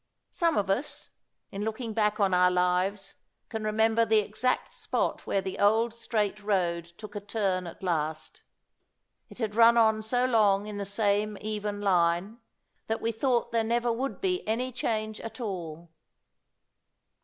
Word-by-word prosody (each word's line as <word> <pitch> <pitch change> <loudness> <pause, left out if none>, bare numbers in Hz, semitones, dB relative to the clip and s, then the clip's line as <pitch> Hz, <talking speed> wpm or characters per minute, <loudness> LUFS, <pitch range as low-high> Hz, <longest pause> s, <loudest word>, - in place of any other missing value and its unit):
Some 335 -3 +1
of 200 -1 +1
us, 250 +10 -2 0.4
in 200 +1 -4
looking 220 +1 -3
back 210 -1 +1
on 195 -2 +2
our 180 0 +5
lives, 180 +2 0 0.4
can 220 -2 -4
remember 220 +1 +2
the 220 -1 +3
exact 215 +4 0
spot - - -2
where 195 - 0
the 190 - -5
old 220 +3 +3
straight 210 -3 -2
road 175 -5 0
took 205 +5 -12
a - - -2
turn 195 -3 -1
at 170 - -11
last. 155 -3 -2 0.9
It - - -13
had 220 -4 -2
run 230 +1 +6
on 220 -1 +4
so 245 +3 +1
long 210 -5 +3
in 210 -1 -6
the 200 - -2
same 205 +1 0
even 210 -1 -3
line, 180 +3 +1 0.5
that 225 0 -1
we 230 - -1
thought 240 +1 0
there 230 -1 +2
would - - -4
never 240 +2 0
be 365 +2 -2
any 245 +4 -1
change 215 -3 -2
at 225 - -8
all. 170 -7 -5
215 Hz, 160 wpm, -28 LUFS, 195-230 Hz, 0.9 s, run